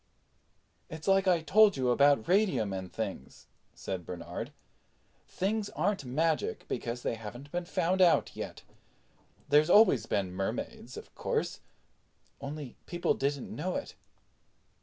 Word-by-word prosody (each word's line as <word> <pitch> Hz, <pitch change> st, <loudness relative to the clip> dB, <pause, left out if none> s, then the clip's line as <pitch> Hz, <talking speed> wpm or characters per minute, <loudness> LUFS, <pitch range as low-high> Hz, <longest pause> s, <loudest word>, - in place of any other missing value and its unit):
"It's 160 Hz, +2 st, -8 dB
like 195 Hz, 0 st, +4 dB
I 175 Hz, -3 st, +4 dB
told 210 Hz, +1 st, +5 dB
you 125 Hz, -2 st, +1 dB
about 140 Hz, -2 st, +4 dB
radium 175 Hz, -, +2 dB
and 95 Hz, -1 st, -5 dB
things," 100 Hz, -11 st, -6 dB, 0.3 s
said 95 Hz, -2 st, -5 dB
Bernard. 85 Hz, 0 st, -6 dB, 0.8 s
"Things 205 Hz, +2 st, -1 dB
aren't 200 Hz, -9 st, 0 dB
magic 155 Hz, +5 st, -1 dB
because 120 Hz, 0 st, -4 dB
they -, -, 0 dB
haven't 120 Hz, +6 st, -9 dB
been 175 Hz, 0 st, -2 dB
found 180 Hz, +1 st, 0 dB
out 175 Hz, -2 st, +4 dB
yet. -, -, -7 dB, 0.9 s
There's 150 Hz, +3 st, +5 dB
always 175 Hz, -, +6 dB
been 95 Hz, -3 st, -1 dB
Mermaids, 95 Hz, +1 st, -4 dB
of -, -, -11 dB
course, -, -, -2 dB, 0.8 s
only 140 Hz, -1 st, -7 dB
people 175 Hz, 0 st, 0 dB
didn't 140 Hz, 0 st, -2 dB
know 180 Hz, +5 st, -2 dB
it." 280 Hz, -, -4 dB
145 Hz, 130 wpm, -30 LUFS, 115-180 Hz, 0.9 s, always